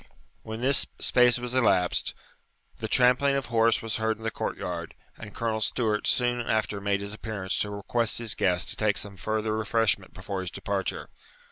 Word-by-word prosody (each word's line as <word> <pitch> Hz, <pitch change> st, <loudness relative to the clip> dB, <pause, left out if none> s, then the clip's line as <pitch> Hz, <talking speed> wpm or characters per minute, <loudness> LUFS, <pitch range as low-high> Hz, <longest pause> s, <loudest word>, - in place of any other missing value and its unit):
When 110 Hz, +1 st, -6 dB
this 135 Hz, +2 st, +2 dB
space 125 Hz, -1 st, +4 dB
was 120 Hz, 0 st, -4 dB
elapsed, 100 Hz, -8 st, +2 dB, 0.6 s
the 110 Hz, -, -4 dB
trampling 125 Hz, +4 st, +4 dB
of 135 Hz, -, -1 dB
horse 115 Hz, 0 st, +3 dB
was 115 Hz, -2 st, -2 dB
heard 110 Hz, 0 st, 0 dB
in 110 Hz, -, -13 dB
the 110 Hz, -, -1 dB
court -, -, -3 dB
yard, 85 Hz, -2 st, -5 dB, 0.2 s
and 105 Hz, -2 st, -11 dB
Colonel 110 Hz, -1 st, -1 dB
Stewart 105 Hz, +1 st, 0 dB
soon 120 Hz, -1 st, +2 dB
after 110 Hz, -3 st, -1 dB
made 100 Hz, 0 st, 0 dB
his 100 Hz, +1 st, -5 dB
appearance 105 Hz, -4 st, -3 dB
to 105 Hz, -, -1 dB
request 105 Hz, +3 st, 0 dB
his 115 Hz, -2 st, +2 dB
guest 90 Hz, -2 st, +1 dB
to -, -, -1 dB
take 105 Hz, -1 st, +1 dB
some 100 Hz, -2 st, -2 dB
further 110 Hz, +3 st, -1 dB
refreshment 110 Hz, -3 st, 0 dB
before 95 Hz, +1 st, -4 dB
his 95 Hz, -, -4 dB
departure. 100 Hz, 0 st, -3 dB
110 Hz, 180 wpm, -27 LUFS, 100-115 Hz, 0.6 s, space